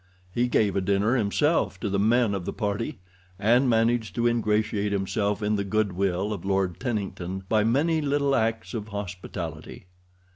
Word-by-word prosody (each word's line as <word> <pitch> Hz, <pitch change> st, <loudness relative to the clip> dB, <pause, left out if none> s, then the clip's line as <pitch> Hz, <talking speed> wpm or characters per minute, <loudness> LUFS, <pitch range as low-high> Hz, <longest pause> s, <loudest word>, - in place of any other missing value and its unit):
He 120 Hz, +3 st, +1 dB
gave 105 Hz, -4 st, +2 dB
a 100 Hz, -, +1 dB
dinner 100 Hz, +5 st, +2 dB
himself 130 Hz, +8 st, +1 dB
to 110 Hz, -, -1 dB
the 100 Hz, 0 st, 0 dB
men 115 Hz, +1 st, +3 dB
of 95 Hz, -2 st, -3 dB
the -, -, -3 dB
party, 110 Hz, +6 st, -2 dB, 0.4 s
and 120 Hz, +6 st, +3 dB
managed 115 Hz, -3 st, +1 dB
to 120 Hz, -, 0 dB
ingratiate 105 Hz, -3 st, +1 dB
himself 100 Hz, +1 st, -1 dB
in 105 Hz, 0 st, +1 dB
the 100 Hz, -, -1 dB
good 105 Hz, 0 st, 0 dB
will 95 Hz, +2 st, 0 dB
of 100 Hz, -, -6 dB
Lord 95 Hz, -2 st, 0 dB
Tennington 95 Hz, -6 st, -3 dB
by 110 Hz, 0 st, +3 dB
many 150 Hz, +8 st, +2 dB
little 140 Hz, -1 st, +1 dB
acts 115 Hz, +1 st, -1 dB
of 110 Hz, -3 st, -4 dB
hospitality. 100 Hz, -5 st, -6 dB
105 Hz, 170 wpm, -26 LUFS, 100-120 Hz, 0.4 s, men